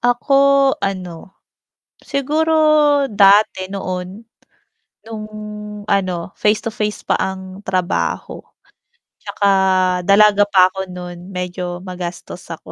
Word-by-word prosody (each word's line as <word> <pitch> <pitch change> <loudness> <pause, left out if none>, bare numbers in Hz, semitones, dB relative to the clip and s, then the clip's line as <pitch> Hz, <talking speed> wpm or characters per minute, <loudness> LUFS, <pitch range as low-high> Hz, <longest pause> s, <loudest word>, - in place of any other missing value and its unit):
Ako, 275 +3 +3
ano, 185 -2 -5 0.6
siguro 305 +3 0 0.6
dati 200 -1 +4
noon 190 +2 -6 0.8
nung 220 -1 -7 0.6
ano, 185 -3 -1
face-to-face 210 0 -1
pa - - 0
ang 190 0 -5
trabaho, 185 -1 -2 0.8
tsaka 200 - -2 0.6
dalaga 205 +1 +5
pa 185 -2 +4
ako 190 0 -5
nun 180 +1 -9
medyo 180 0 -5
magastos 180 -1 -7
ako. 160 - -12
195 Hz, 90 wpm, -18 LUFS, 180-215 Hz, 0.8 s, dalaga